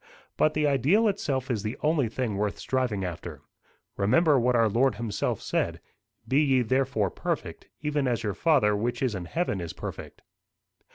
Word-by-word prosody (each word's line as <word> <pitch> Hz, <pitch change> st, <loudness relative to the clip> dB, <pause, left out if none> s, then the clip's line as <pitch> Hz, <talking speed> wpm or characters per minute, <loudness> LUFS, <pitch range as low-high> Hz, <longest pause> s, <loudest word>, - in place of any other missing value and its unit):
But 155 Hz, -, +2 dB
the 150 Hz, 0 st, +2 dB
ideal 145 Hz, -, +3 dB
itself 140 Hz, -10 st, -1 dB
is 110 Hz, -4 st, -1 dB
the 110 Hz, +5 st, -4 dB
only 150 Hz, -6 st, +2 dB
thing 115 Hz, -2 st, -2 dB
worth 105 Hz, 0 st, -1 dB
striving 125 Hz, -7 st, -1 dB
after. 85 Hz, -3 st, -7 dB, 0.5 s
Remember 140 Hz, -, +4 dB
what 125 Hz, +1 st, +2 dB
our 115 Hz, -1 st, +4 dB
Lord 120 Hz, +5 st, +2 dB
himself 115 Hz, -4 st, -2 dB
said: -, -, -1 dB, 0.5 s
'Be 135 Hz, +3 st, +3 dB
ye 135 Hz, -4 st, +3 dB
therefore 120 Hz, -5 st, 0 dB
perfect, -, -, -4 dB
even 150 Hz, -2 st, 0 dB
as 120 Hz, -2 st, -1 dB
your 105 Hz, -2 st, -1 dB
Father 135 Hz, -, +3 dB
which 120 Hz, +6 st, -2 dB
is 125 Hz, -4 st, +1 dB
in 95 Hz, -3 st, -5 dB
heaven 105 Hz, -, -2 dB
is 85 Hz, -2 st, -5 dB
perfect. -, -, -8 dB
125 Hz, 170 wpm, -27 LUFS, 105-145 Hz, 0.5 s, Remember